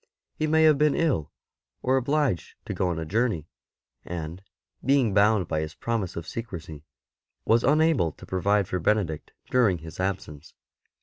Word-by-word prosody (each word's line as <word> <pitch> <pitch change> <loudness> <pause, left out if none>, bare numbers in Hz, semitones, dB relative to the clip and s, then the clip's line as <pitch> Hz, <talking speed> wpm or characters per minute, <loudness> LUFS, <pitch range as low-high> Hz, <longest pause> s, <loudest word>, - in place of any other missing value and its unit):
He 155 - -1
may 160 +1 +4
have 155 -3 +5
been 150 -1 +3
ill; 140 - 0 0.5
or 130 +1 +3
obliged 135 - 0
to - - -4
go 95 - 0
on 85 -2 -1
a 80 - -3
journey, 105 -3 0 0.6
and, 85 +1 -6 0.4
being 135 -5 +3
bound 105 -2 +4
by 80 - -1
his 80 0 -4
promise 115 -6 -2
of 85 - -6
secrecy, 85 -10 -7 0.6
was 115 +1 +3
unable 150 - +3
to - - -13
provide 100 +1 +1
for 90 - -2
Benedict 85 -4 0 0.2
during 115 -8 +3
his 80 +1 -11
absence. 90 -6 -4
100 Hz, 160 wpm, -26 LUFS, 85-130 Hz, 0.6 s, have